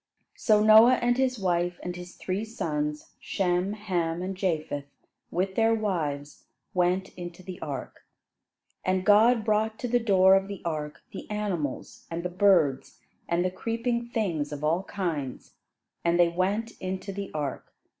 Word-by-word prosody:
So 210 -2 +3
Noah 220 +4 +8
and 245 0 +1
his 255 -1 +1
wife, 175 -2 0
and 180 0 -4
his 180 0 -9
three 190 +3 -3
sons, 150 - -3
Shem, 180 +1 0
Ham 175 -5 -2
and 190 +1 -3
Japheth, 155 -6 -2 0.4
with 190 +2 -1
their 225 +2 +3
wives, 155 -9 -3 0.3
went 180 +1 +1
into 175 0 -9
the 185 -1 -8
ark. 140 -4 -6 0.8
And 185 0 0
God 220 +2 +5
brought 220 0 +1
to 245 - -3
the 245 +1 +2
door 190 -4 +5
of 195 0 +3
the 200 -2 -7
ark 150 -3 -4
the - - -8
animals, 195 -10 -3
and 170 +1 -4
the 180 - -2
birds, 175 -8 +2 0.3
and 170 +1 +1
the 185 - 0
creeping 235 +4 -2
things 175 -12 -1
of 145 0 -6
all 165 +4 +2
kinds; 160 -10 -4 0.5
and 170 +1 +2
they 175 -1 +6
went 195 +6 -1
into 190 +1 -4
the 200 0 -5
ark. 145 -3 -4
185 Hz, 155 wpm, -27 LUFS, 170-210 Hz, 0.8 s, Noah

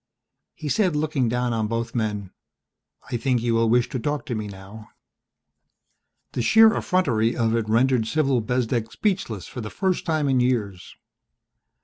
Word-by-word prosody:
He 150 - -7
said, 180 +1 +1
looking 150 -5 0
down 125 0 -1
on 110 -1 -1
both 115 +2 -3
men, 105 -5 -2 0.8
"I 120 - 0
think 125 +1 +1
you 120 -1 +1
will 115 0 +2
wish 120 +1 +3
to 130 - -3
talk 145 +4 -2
to 135 - -4
me 110 -2 -3
now." 100 +2 -11 1.4
The - - -2
sheer 220 - +6
effrontery 120 - +1
of 115 -1 +1
it 110 -2 -1
rendered 120 0 +2
Cyril 135 -3 +1
Bezdek 115 0 -1
speechless 185 - -2
for 125 - -7
the 105 - -6
first 190 - -1
time 155 -3 0
in 130 -2 +2
years. 110 -7 -1
120 Hz, 160 wpm, -24 LUFS, 110-140 Hz, 1.4 s, sheer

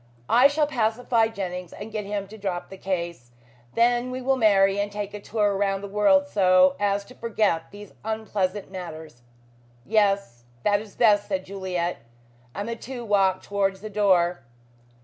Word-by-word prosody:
I 250 +4 +7
shall 295 +1 +1
pacify 230 -3 +1
Jennings 180 -5 -5
and 215 +2 -8
get 215 -2 -4
him 200 -1 -3
to 220 - -10
drop 185 -3 -4
the 195 - -10
case. 170 -9 -4 0.5
Then 240 +1 +3
we 255 0 -4
will 265 +1 +1
marry 200 -4 +4
and 205 0 -1
take 205 0 -5
a 210 - -6
tour 205 -1 0
round 195 0 0
the - - -4
world 210 +9 +3
so 185 -5 +4
as 200 0 0
to 250 - -14
forget 215 -9 0
these 205 -1 -12
unpleasant 210 -3 -2
matters." 160 -8 -8 0.6
"Yes, 200 - +1 0.2
that 205 0 +2
is 215 -2 -13
best," 210 -3 +4
said 190 -2 -2
Juliet, 185 -3 -3 0.6
and 205 +2 -4
the 230 - -3
two 240 +1 -7
walked 195 -3 +2
towards 195 -1 -1
the 215 0 -7
door. 180 -5 +2
205 Hz, 170 wpm, -25 LUFS, 190-220 Hz, 0.6 s, I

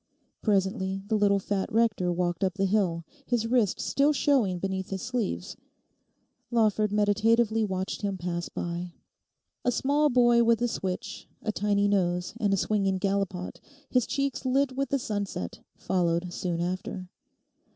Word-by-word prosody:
Presently 195 -2 0
the 220 - +2
little 205 -1 +3
fat 195 0 -2
rector 215 -5 +2
walked 175 0 -1
up 190 -1 0
the 195 -1 +1
hill, 185 -5 +1 0.2
his 240 -2 +1
wrists 230 -4 +1
still 280 +2 +3
showing 255 -11 +2
beneath 190 +1 -3
his 190 -1 -4
sleeves. 245 -4 -3 0.9
Lawford 215 -3 +2
meditatively 220 +2 +3
watched 190 0 -3
him 200 -2 -2
pass 175 -1 -3
by. 175 0 -4 0.7
A 245 - +2
small 290 +4 +2
boy 240 -2 +5
with 230 -1 +3
a - - +3
switch, 190 -5 -4
a 215 - 0
tiny 205 -1 +1
nose, 180 -3 0
and 205 -3 +1
a 195 - +3
swinging 195 -1 +1
gallipot, 195 -2 -2 0.3
his 250 -2 +2
cheeks 275 -1 -1
lit 265 0 +1
with 275 +1 -1
the 280 - +2
sunset, 205 - -4 0.2
followed 175 -1 0
soon 175 -2 -2
after. 185 +1 -3
200 Hz, 150 wpm, -28 LUFS, 185-230 Hz, 0.9 s, boy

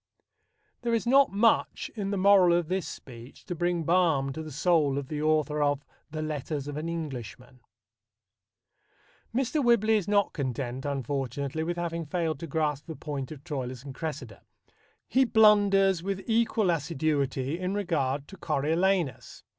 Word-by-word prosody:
There 235 -1 +1
is 230 - -1
not 270 +3 +5
much 215 +3 +1
in 205 -3 -3
the 200 - -1
moral 185 -3 +5
of 175 -2 -2
this 185 -3 -1
speech 120 -4 -11
to - - -4
bring 175 0 -1
balm 160 -5 +2
to 160 - -5
the 155 -1 -8
soul 150 -2 +2
of 140 -2 -4
the 150 -1 -3
author 155 -1 +1
of 145 -1 +1 0.2
the 155 0 -4
Letters 150 -1 -4
of 145 - -5
an 155 +2 -3
Englishman. 130 -6 -6 1.7
Mr. 265 +4 0
Whibley 220 -2 +4
is 200 - -3
not 205 -1 +2
content, 130 -1 -3
unfortunately, 140 +1 -3
with 175 +2 -3
having 170 -2 -3
failed 160 -3 -1
to 165 - -6
grasp 150 -1 -1
the 160 - -6
point 145 -4 -5
of 145 -3 -9
Troilus 130 -5 -5
and 140 -2 -8
Cressida. 135 -8 -6 0.7
He 265 - +3
blunders 205 -5 +4
with 195 +1 -3
equal 225 -4 +2
assiduity 145 -2 -1
in 185 +2 -2
regard 145 -8 -1
to 195 - -11
Coriolanus. 165 - 0
160 Hz, 155 wpm, -28 LUFS, 140-190 Hz, 1.7 s, not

